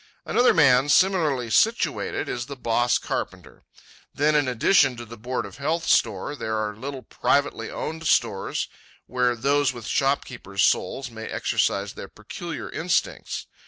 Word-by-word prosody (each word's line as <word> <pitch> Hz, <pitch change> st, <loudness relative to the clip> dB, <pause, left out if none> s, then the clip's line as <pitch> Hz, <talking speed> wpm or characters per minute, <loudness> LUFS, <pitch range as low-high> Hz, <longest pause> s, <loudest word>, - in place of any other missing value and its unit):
Another 245 Hz, -, +4 dB
man, 135 Hz, -3 st, +4 dB
similarly 150 Hz, -, +2 dB
situated, -, -, +1 dB
is 120 Hz, 0 st, -4 dB
the 140 Hz, -, -7 dB
boss 120 Hz, -1 st, +1 dB
carpenter. -, -, -6 dB, 0.5 s
Then, 150 Hz, +1 st, +2 dB
in 145 Hz, -2 st, +2 dB
addition 130 Hz, -, +3 dB
to 120 Hz, -, -7 dB
the 115 Hz, +1 st, -10 dB
Board 125 Hz, +3 st, -3 dB
of -, -, -11 dB
Health 160 Hz, +4 st, -1 dB
store, 110 Hz, +5 st, +1 dB
there 110 Hz, -5 st, -3 dB
are 105 Hz, -1 st, -2 dB
little 130 Hz, +3 st, -7 dB
privately 145 Hz, +5 st, 0 dB
owned 160 Hz, 0 st, -5 dB
stores, 110 Hz, -5 st, +1 dB, 0.4 s
where 125 Hz, 0 st, +1 dB
those 140 Hz, +3 st, +1 dB
with 120 Hz, -2 st, -9 dB
shopkeeper's 130 Hz, -7 st, -1 dB
souls 130 Hz, +7 st, +1 dB
may 110 Hz, -1 st, -7 dB
exercise 100 Hz, +1 st, 0 dB
their -, -, -8 dB
peculiar 160 Hz, -, -7 dB
instincts. 170 Hz, +2 st, -2 dB
130 Hz, 145 wpm, -24 LUFS, 115-145 Hz, 0.5 s, Another